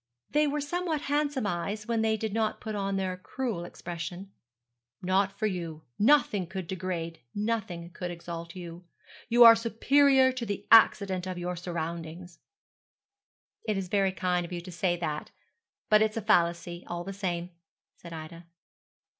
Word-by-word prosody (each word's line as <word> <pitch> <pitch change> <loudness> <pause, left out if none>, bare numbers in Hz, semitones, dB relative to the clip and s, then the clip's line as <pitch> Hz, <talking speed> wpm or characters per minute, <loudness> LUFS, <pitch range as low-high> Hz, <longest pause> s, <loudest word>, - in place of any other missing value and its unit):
They 300 0 +3
were 295 +1 -1
somewhat 325 0 -2
handsome 290 -4 0
eyes 205 +3 -3
when 230 -1 +1
they 220 0 +2
did 215 -1 -3
not 220 -1 0
put 220 -2 -5
on 195 -1 -1
their 190 -1 -1
cruel 220 -1 -4
expression. 175 +2 -7 0.7
'Not 190 +2 +2
for 215 - -1
you. 170 -6 -3 0.2
Nothing 210 - +4
could 190 +1 -5
degrade, 170 -2 -4 0.2
nothing 205 -6 -2
could 180 +1 -5
exalt 170 0 -7
you. 175 -1 -9 0.4
You 240 +1 +7
are 230 -1 +11
superior 260 +4 +4
to 255 -1 -5
the 205 -2 -4
accident 195 -5 +5
of 185 -1 -4
your 175 +1 -3
surroundings.' 170 0 -5 1.3
'It's 195 -4 -1
very 195 -1 +2
kind 180 -1 0
of 170 - -8
you 175 -1 -4
to 180 +1 -10
say 175 +1 0
that; 155 -3 -3 0.6
but 215 0 +5
it's 220 0 +1
a - - -1
fallacy, 175 0 +1
all 175 0 -4
the 195 +2 -6
same,' 180 -3 -3 0.4
said 170 - -12
Ida. 165 +1 -9
185 Hz, 155 wpm, -29 LUFS, 175-220 Hz, 1.3 s, are